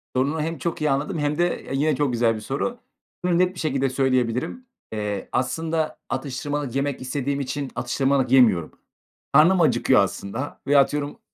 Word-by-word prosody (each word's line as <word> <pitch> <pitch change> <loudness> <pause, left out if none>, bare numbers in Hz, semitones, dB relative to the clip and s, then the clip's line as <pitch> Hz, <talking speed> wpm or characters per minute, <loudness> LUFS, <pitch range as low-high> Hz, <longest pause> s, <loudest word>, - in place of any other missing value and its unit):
Sorunu 140 +5 +1
hem 165 +2 -3
çok 170 -2 -3
iyi 150 - +2
anladım 145 +4 -1
hem 145 +1 0
de 175 0 0
yine 150 +2 +2
çok 145 -2 0
güzel 115 -1 +2
bir - - -5
soru. 140 - -3 0.5
Bunu 175 -1 +2
net 185 0 +2
bir - - -8
şekilde 135 -3 0
söyleyebilirim. 130 - 0 0.3
Eee, 105 -2 -3
aslında 160 +5 -1
atıştırmalık 145 -1 -3
yemek 140 0 -1
istediğim 140 +2 -2
için 140 0 -3
atıştırmalık 135 +1 0
yemiyorum. 110 -11 +4 0.6
Karnım 170 +5 +6
acıkıyor 135 -5 +4
aslında 100 +8 -5
veya 145 0 +6
atıyorum, 145 - 0
140 Hz, 160 wpm, -23 LUFS, 130-155 Hz, 0.6 s, Karnım